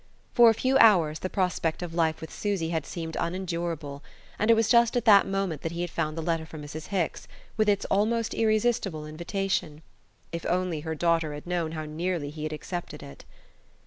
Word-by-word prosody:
For 240 Hz, -1 st, +8 dB
a 225 Hz, -, +3 dB
few 260 Hz, +4 st, +2 dB
hours 170 Hz, -9 st, +5 dB
the 185 Hz, -, -3 dB
prospect 180 Hz, -3 st, -1 dB
of 170 Hz, -2 st, -6 dB
life 160 Hz, -1 st, +1 dB
with 160 Hz, -, -8 dB
Susy 195 Hz, -6 st, -2 dB
had 160 Hz, -4 st, -2 dB
seemed 165 Hz, -2 st, -5 dB
unendurable; 170 Hz, -5 st, -3 dB, 0.4 s
and 215 Hz, -, +1 dB
it 230 Hz, -, +8 dB
was 225 Hz, -1 st, +2 dB
just 235 Hz, 0 st, +4 dB
at 240 Hz, -, -1 dB
that 205 Hz, -3 st, +7 dB
moment 195 Hz, -6 st, -2 dB
that 165 Hz, -, -4 dB
he 170 Hz, -, -3 dB
had 175 Hz, -1 st, -3 dB
found 155 Hz, -1 st, -2 dB
the 165 Hz, -, -3 dB
letter 165 Hz, -1 st, 0 dB
from 155 Hz, -1 st, -9 dB
Mrs. 155 Hz, +2 st, -7 dB
Hicks, 185 Hz, -5 st, -2 dB, 0.3 s
with 215 Hz, -1 st, +2 dB
its 200 Hz, -1 st, +1 dB
almost 225 Hz, +3 st, +1 dB
irresistible 215 Hz, -7 st, +1 dB
invitation. 170 Hz, -1 st, -3 dB, 0.5 s
If 170 Hz, 0 st, -5 dB
only 180 Hz, -3 st, 0 dB
her 160 Hz, +1 st, -4 dB
daughter 165 Hz, -2 st, +1 dB
had 145 Hz, -, -9 dB
known 175 Hz, -2 st, -2 dB
how 155 Hz, -1 st, -4 dB
nearly 160 Hz, -1 st, -3 dB
he 155 Hz, 0 st, -9 dB
had 155 Hz, 0 st, -3 dB
accepted 155 Hz, -1 st, -6 dB
it! 140 Hz, -, -12 dB
170 Hz, 200 wpm, -27 LUFS, 155-195 Hz, 0.5 s, For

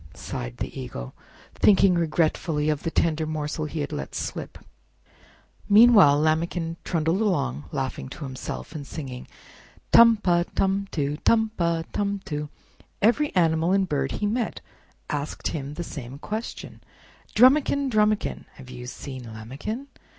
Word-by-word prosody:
sighed -, -, -6 dB
the -, -, -5 dB
Eagle, -, -, -7 dB, 0.4 s
thinking 195 Hz, -2 st, +5 dB
regretfully 155 Hz, -2 st, 0 dB
of 150 Hz, -1 st, 0 dB
the 165 Hz, -, -2 dB
tender 160 Hz, -1 st, +1 dB
morsel 155 Hz, 0 st, -3 dB
he 155 Hz, 0 st, -4 dB
had 145 Hz, -, -4 dB
let 70 Hz, -1 st, -5 dB
slip. -, -, -5 dB, 1.1 s
Meanwhile 205 Hz, -9 st, +7 dB
Lambikin 165 Hz, +2 st, 0 dB
trundled 165 Hz, +3 st, 0 dB
along, 75 Hz, -, 0 dB
laughing 130 Hz, -1 st, -3 dB
to 145 Hz, -, -8 dB
himself, 130 Hz, +3 st, -6 dB
and 145 Hz, -3 st, -7 dB
singing: 130 Hz, -5 st, -7 dB, 0.6 s
"Tum 230 Hz, -1 st, +8 dB
pa, 175 Hz, -4 st, +2 dB
tum 195 Hz, +1 st, +1 dB
too; 145 Hz, -1 st, -2 dB
Tum 220 Hz, +4 st, +2 dB
pa, 170 Hz, -1 st, 0 dB
tum 200 Hz, 0 st, -1 dB
too!" 150 Hz, -4 st, -4 dB, 0.5 s
Every 245 Hz, +8 st, +3 dB
animal 165 Hz, 0 st, +3 dB
and 195 Hz, -1 st, +2 dB
bird 140 Hz, -4 st, -1 dB
he 210 Hz, -, -2 dB
met 225 Hz, +2 st, -1 dB, 0.5 s
asked 145 Hz, 0 st, -3 dB
him 145 Hz, -2 st, -5 dB
the 175 Hz, -, -4 dB
same 135 Hz, -4 st, -8 dB
question: 215 Hz, +9 st, -6 dB, 0.5 s
"Drumikin! 275 Hz, +3 st, +5 dB
Drumikin! 215 Hz, -1 st, +1 dB
Have 130 Hz, -1 st, -12 dB
you 125 Hz, 0 st, -8 dB
seen 130 Hz, -1 st, -8 dB
Lambikin?" 135 Hz, -, -6 dB
160 Hz, 140 wpm, -25 LUFS, 145-200 Hz, 1.1 s, Tum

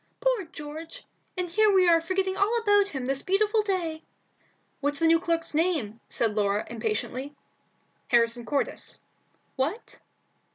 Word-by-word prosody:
"Poor -, -, +1 dB
George! 320 Hz, -1 st, -9 dB, 0.3 s
and 360 Hz, -1 st, -1 dB
here 425 Hz, +5 st, +3 dB
we 375 Hz, -2 st, +5 dB
are 335 Hz, -1 st, +5 dB
forgetting 375 Hz, +2 st, -1 dB
all 415 Hz, +5 st, +2 dB
about 410 Hz, -3 st, +3 dB
him 270 Hz, -9 st, -4 dB
this 270 Hz, +1 st, 0 dB
beautiful 420 Hz, +3 st, +2 dB
day!" 350 Hz, -6 st, -2 dB, 0.8 s
"What's 290 Hz, 0 st, 0 dB
the 330 Hz, -, +1 dB
new 330 Hz, 0 st, +5 dB
clerk's 335 Hz, -2 st, -1 dB
name?" 300 Hz, -, 0 dB
said 225 Hz, -2 st, 0 dB
Laura, 205 Hz, 0 st, 0 dB
impatiently. 240 Hz, +5 st, -3 dB, 0.7 s
"Harrison 235 Hz, 0 st, +2 dB
Cordis." 280 Hz, +3 st, -2 dB, 0.6 s
"What?" 310 Hz, -, -3 dB
330 Hz, 135 wpm, -27 LUFS, 270-385 Hz, 0.8 s, we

